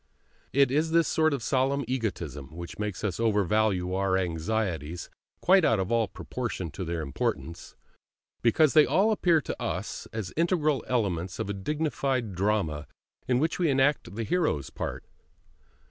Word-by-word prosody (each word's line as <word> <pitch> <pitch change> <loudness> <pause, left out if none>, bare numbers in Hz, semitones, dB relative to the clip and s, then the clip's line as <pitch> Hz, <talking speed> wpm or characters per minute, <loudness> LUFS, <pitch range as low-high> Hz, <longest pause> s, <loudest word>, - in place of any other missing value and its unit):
It 140 -1 +4
is 155 +4 +2
this 165 0 +3
sort 160 0 +2
of 140 -5 -2
solemn 135 +2 +1
egotism 85 - -3
which 85 +2 -8
makes 105 -2 -3
us 95 -5 -2
overvalue 105 -4 +1
our 95 0 +1
anxieties 85 -2 -2 0.3
quite 190 0 +5
out 115 -8 +3
of 95 +2 -2
all 115 -2 +2
proportion 105 -7 -5
to 95 - -5
their 85 -1 -3
importance, 80 +3 -3 0.7
because 140 +5 +4
they 155 -1 +7
all 205 +4 +3
appear 175 -6 +3
to - - -6
us - - -4
as 110 -5 -5
integral 155 -5 +1
elements 95 -7 -1
of 100 - -2
a - - -2
dignified 135 -1 -1
drama 90 -7 0 0.4
in 125 0 +3
which 160 +6 0
we 170 -3 +2
enact 135 -8 +1
the 115 - -2
hero's 155 - 0
part. - - -5
110 Hz, 155 wpm, -28 LUFS, 90-145 Hz, 0.7 s, they